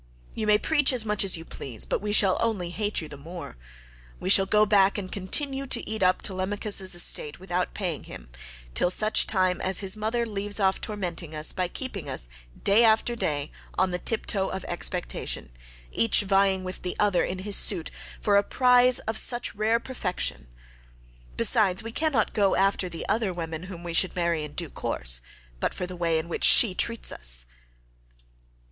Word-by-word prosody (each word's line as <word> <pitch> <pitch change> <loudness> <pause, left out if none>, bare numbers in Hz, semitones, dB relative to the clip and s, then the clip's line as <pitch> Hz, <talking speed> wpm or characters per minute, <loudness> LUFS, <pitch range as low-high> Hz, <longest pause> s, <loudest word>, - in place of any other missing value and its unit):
You 215 - -3
may 210 0 +5
preach 295 +4 +2
as 240 -3 0
much 210 -1 +2
as 190 -3 +2
you 165 - -10
please, 120 -9 -4
but - - -2
we 210 0 -3
shall 195 -3 +3
only 205 -7 -1
hate 210 +1 -2
you 160 - -7
the 145 - -9
more. 165 - -9 0.6
We 185 - -1
shall 195 -1 +6
go 210 +2 +4
back 200 -1 +3
and 185 -2 -6
continue 270 +8 -1
to - - 0
eat 220 -1 -4
up 185 0 +2
Telemachus's 190 0 +1
estate 155 -3 +1
without 180 -1 -3
paying 180 -7 -4
him, - - -11 0.4
till 175 - +2
such 215 +4 +3
time 185 -3 0
as 190 0 +2
his 195 0 0
mother 220 +3 -2
leaves 205 -1 -2
off 190 -1 +1
tormenting 175 -6 -4
us 155 0 +3
by 185 -1 -1
keeping 195 - -6
us - - +1 0.3
day 205 +4 +5
after 225 +1 +3
day 145 -9 -3 0.3
on 185 0 +1
the 180 - -2
tiptoe 200 -2 0
of 190 - -5
expectation, 175 - -3 0.4
each 230 -2 +3
vying 195 -1 +1
with 185 0 -7
the 180 - -4
other 205 -4 +2
in 185 - -3
his 200 +2 -3
suit 175 -6 +2 0.3
for 205 -1 +2
a 200 - +3
prize 250 +1 +4
of 220 0 -3
such 240 +1 -2
rare 220 +3 +1
perfection. 180 - -4 0.9
Besides 190 -2 +2
we 230 - -7
cannot 280 -5 0
go 200 -2 +2
after 195 -1 +1
the 165 -1 -7
other 215 -3 0
women 165 -1 -6
whom 180 -2 -9
we 170 -1 -5
should 185 +2 +2
marry 170 -3 -1
in 150 -1 -8
due - - -3
course, - - +1 0.4
but - - -2
for - - -3
the 180 0 -8
way 170 -2 0
in 160 +1 -3
which 170 - -5
she 220 -6 +8
treats 230 +4 0
us." - - -1
190 Hz, 190 wpm, -26 LUFS, 175-215 Hz, 0.9 s, she